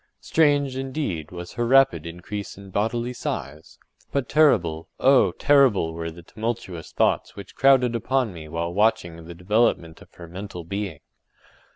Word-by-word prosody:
Strange, 145 -4 +2
indeed, 130 - -3
was 90 -1 -8
her 120 -1 -1
rapid 135 -6 +4
increase 95 +5 -7
in 100 -1 -12
bodily 120 +5 -1
size—but 80 - -6
terrible, 90 - +2
oh! 130 -8 +5
terrible 130 - +3
were 85 0 -4
the 85 +1 -12
tumultuous 110 -5 -5
thoughts - - 0
which 100 - -10
crowded 130 -3 +4
upon 125 -2 0
me 80 -2 -9
while 85 +2 -3
watching 85 -5 0
the 85 +1 -9
development 90 -3 0
of - - -17
her 85 - -11
mental 90 0 -8
being. 100 +3 -5
100 Hz, 145 wpm, -24 LUFS, 85-125 Hz, -, oh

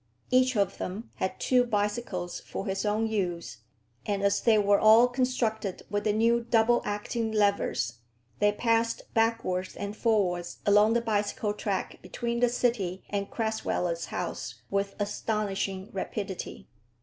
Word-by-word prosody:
Each 255 -1 +4
of 200 - 0
them 200 +6 -5
had 190 - -2
two 250 -1 +3
bicycles 205 -5 -2
for 195 - -6
his 195 +2 -1
own 215 +2 +1
use, 180 -6 -2 0.5
and 200 -1 -2
as 200 0 +2
they 225 -2 +4
were 205 -1 +4
all 220 +3 +7
constructed 245 -6 -1
with 205 0 -1
the 215 - +3
new 230 +2 +3
double 235 0 +3
acting 220 +2 -2
levers, 200 - +1 0.4
they 205 0 +4
passed 230 +1 +1
backwards 225 -5 0
and 205 +1 -5
forwards 190 -7 0
along 210 +2 +5
the 235 - +2
bicycle 210 -1 -1
track 200 -2 -3
between 235 -1 -3
the 245 0 +4
city 225 -7 0
and 200 -1 -2
Crasweller's 220 -6 -1
house - - -5
with 200 0 -1
astonishing 200 -2 -2
rapidity. 190 - -5
210 Hz, 140 wpm, -28 LUFS, 195-230 Hz, 0.5 s, all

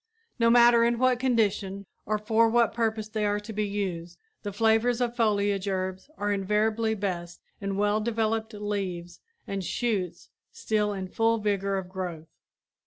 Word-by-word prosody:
No 230 0 +4
matter 235 0 +6
in 235 0 +2
what 255 0 +3
condition 210 -6 0 0.2
or 215 +1 +1
for 225 +2 +3
what 235 0 +3
purpose 220 -2 -1
they 215 0 -3
are 205 0 +1
to 220 +1 -8
be 210 0 -1
used 180 -4 -4 0.2
the 205 - -4
flavors 225 +3 +2
of 240 -1 -1
foliage 205 -3 +1
herbs 190 +3 -3
are 205 0 -1
invariably 215 +3 +1
best 175 -4 -4 0.2
in 195 -1 -3
well 205 +1 +2
developed 220 0 -1
leaves 195 -4 -4 0.3
and 195 -1 -4
shoots 205 -3 -2 0.2
still 210 -1 0
in 190 -2 -4
full 225 +4 +1
vigor 200 -2 0
of 190 -2 -4
growth. 180 -4 -6
210 Hz, 160 wpm, -27 LUFS, 195-225 Hz, 0.3 s, matter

